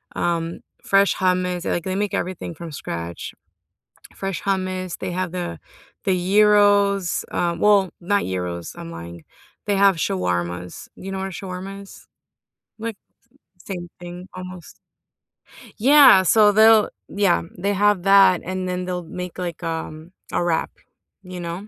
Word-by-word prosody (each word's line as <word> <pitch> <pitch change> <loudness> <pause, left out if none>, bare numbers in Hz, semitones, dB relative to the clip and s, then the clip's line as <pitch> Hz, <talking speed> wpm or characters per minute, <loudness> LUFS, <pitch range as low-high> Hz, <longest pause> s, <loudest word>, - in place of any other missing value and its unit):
um, 170 -1 -1 0.2
fresh 195 0 +3
hummus 180 -1 0
like, 170 - -1
they 190 0 -2
make 205 -1 -1
everything 175 -2 -3
from 170 0 -8
scratch. 85 - -6 0.8
Fresh 195 0 -4
hummus, 185 -2 -2
they 185 -1 -4
have 185 -1 -2
the 175 - -5 0.5
the 190 - +3
gyros, 200 0 +3
um 170 -1 -1
well, 200 -3 +4
not 200 +3 +1
gyros- 90 -2 -4
I'm 85 - -8
lying- 85 0 -9 0.4
they 205 - +1
have 195 -2 +5
shawarmas, 90 - -3
you 195 +1 -8
know 190 - -4
what 190 - -3
a - - -6
shawarma 190 +2 -7
is? 195 - -15 0.7
Like, 225 -1 -5 0.7
same 175 -3 -6
thing 175 +1 -9
almost 185 -2 -10 1.0
Yeah, 265 -5 +7
so 210 +3 +5
they'll 220 0 +6 0.2
yeah, 200 -5 +2
they 200 +3 0
have 205 -2 +2
that 195 -2 +6
and 185 +1 -4
then 180 0 -3
they'll 180 -1 -3
make 180 +2 -7
like, 175 -3 -5
um, 160 0 -5 0.2
a - - +1
wrap, 170 -2 0 0.5
you 180 0 -8
know? 175 +4 -6
185 Hz, 145 wpm, -22 LUFS, 170-195 Hz, 1.0 s, Yeah